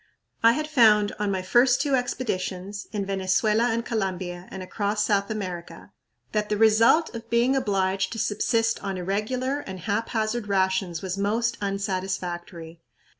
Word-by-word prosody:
I 230 0 +6
had 305 +3 -2
found 215 -8 +5
on 210 -1 0
my 190 -1 -1
first 245 +6 +4
two 285 -2 0
expeditions, 205 -6 -2
in 205 -2 -2
Venezuela 195 +4 +1
and 230 0 0
Colombia 185 -4 -3
and 190 - -7
across 205 +2 -1
South 200 -1 +1
America, 185 -5 -6 0.4
that 210 -1 -1
the 210 - 0
result 225 +9 +4
of 230 0 -8
being 235 +3 +3
obliged 195 -6 0
to - - -6
subsist 225 +2 0
on 195 -2 -3
irregular 220 +9 -1
and 190 -9 -8
haphazard 220 +2 -1
rations 190 -3 0
was 190 +1 -3
most 230 +4 0
unsatisfactory. 185 -4 -4
205 Hz, 145 wpm, -25 LUFS, 190-230 Hz, 0.4 s, I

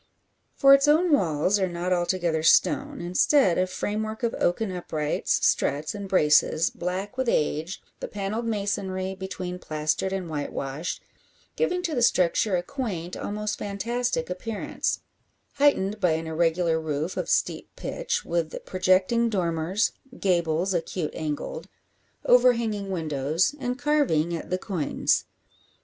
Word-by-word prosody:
For 275 0 +7
its 275 +1 +5
own 320 +4 +4
walls 185 - +2
are 190 -1 +1
not 175 +1 -1
altogether 175 -2 0
stone; 285 - +3
instead 180 - +3
a 185 - +2
framework 215 +4 -3
of 230 - +1
oaken 195 +3 +1
uprights, 155 -4 -1
struts, 145 +2 +1
and 200 -1 -6
braces, 155 -1 +3
black 190 +6 -4
with 260 -2 0
age, 155 +2 -1 0.2
the - - -4
panelled 210 +3 -3
masonry 200 -3 -2
between 185 -1 -6
plastered 155 +4 -1
and 190 -2 -3
white 150 -3 -4
washed, 140 +5 -4 0.5
giving 360 -7 0
to 335 -3 -1
the 245 - 0
structure 185 -1 +3
a 175 - 0
quaint, 185 -11 -4
almost 210 0 -3
fantastic, 240 +4 -2
appearance, 200 +4 -3 0.6
heightened 215 -8 +2
by 180 -5 +3
an 160 +1 -2
irregular 165 0 +1
roof 155 +2 -3
of - - -3
steep - - 0
pitch, - - -3
with 165 -2 -2
projecting 185 +5 +2
dormers, 180 0 0 0.3
gables 175 0 +1
acute 170 -1 -2
angled, 150 -2 -4 0.6
overhanging 235 -5 +3
windows, 160 - 0
and 250 -1 -2
carving 270 - +1
at 165 - -7
the 185 - 0
coigns. 180 -5 0
185 Hz, 135 wpm, -26 LUFS, 165-225 Hz, 0.6 s, For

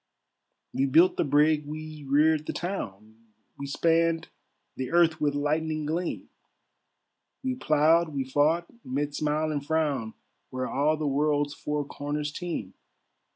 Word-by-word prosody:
"We 135 +2 +1
built 170 +7 +5
the - - +2
brigg, 150 +1 +3
we 155 0 -7
reared 155 +2 +3
the - - -2
town, 110 - -5 0.4
We 140 - -4
spanned 165 +3 +1 0.5
the 130 -1 -4
earth 165 -2 +3
with 145 -1 +1
lightning 155 +1 -1
gleam, 165 +4 -3 1.2
We 260 -1 0
ploughed, 160 - +3
we 140 -3 -2
fought, 150 +6 +2 0.2
mid 145 +3 -2
smile 155 +1 0
and 145 -2 -2
frown, 145 -7 -1 0.3
Where 130 0 -3
all 150 +3 +1
the 155 - -3
world's 145 0 +1
four 150 0 -3
corners 145 +1 -4
teem. 160 - -5
150 Hz, 135 wpm, -27 LUFS, 145-160 Hz, 1.2 s, built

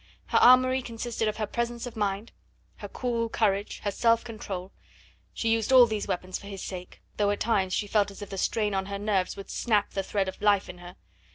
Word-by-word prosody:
Her - - +4
armoury 255 +1 +6
consisted 230 -1 -3
of 215 - -2
her 215 - -1
presence 235 +2 -3
of 245 -1 -8
mind, 205 +1 -2 0.5
her - - -7
cool 235 -2 -2
courage, 205 -2 0
her 205 - 0
self 230 +2 +2
control; 200 -5 -6 0.6
she 230 - -3
used 225 +2 +1
all 255 -2 +9
these 215 -3 -3
weapons 185 +1 -3
for 200 - -12
his 195 -1 -7
sake, 180 -1 -8
though 205 -1 +2
at 205 - -1
times 195 -5 +1
she 205 - 0
felt 205 0 +2
as 200 +1 -9
if 205 - -10
the 195 - -5
strain 210 0 0
on 190 0 -1
her 200 0 -4
nerves 200 -3 -1
would 195 - -8
snap 210 -4 +1
the 195 - -1
thread 195 0 -1
of 190 - -6
life 205 -2 +3
in 180 - -9
her. 175 +1 -11
210 Hz, 220 wpm, -27 LUFS, 195-230 Hz, 0.6 s, all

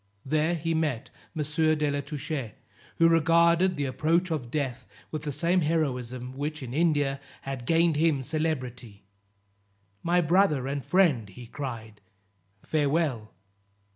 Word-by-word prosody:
There 155 +4 +1
he 165 0 -1
met 150 -7 -1 0.3
M. 150 - 0
de 150 0 +1
la 145 0 -1
Touche, 140 -4 -5 0.4
who 165 - +5
regarded 170 +2 +4
the 145 -2 -1
approach 165 +7 +1
of 135 -7 -2
death 135 -3 -3 0.2
with 155 - -3
the 150 -1 -3
same 170 +6 +1
heroism 130 -5 -2
which, 150 +1 -4
in 120 -1 -6
India, 145 -3 +1 0.2
had 135 -3 -5
gained 165 -1 +3
him 155 -4 +2
celebrity. 125 -9 -3 1.0
"My 175 +1 +2
brother 170 -5 +3
and 140 0 -3
friend," 155 - +2
he 120 +6 -11
cried, 115 -5 -7 0.6
"farewell." 145 -7 0
150 Hz, 135 wpm, -27 LUFS, 130-165 Hz, 1.0 s, who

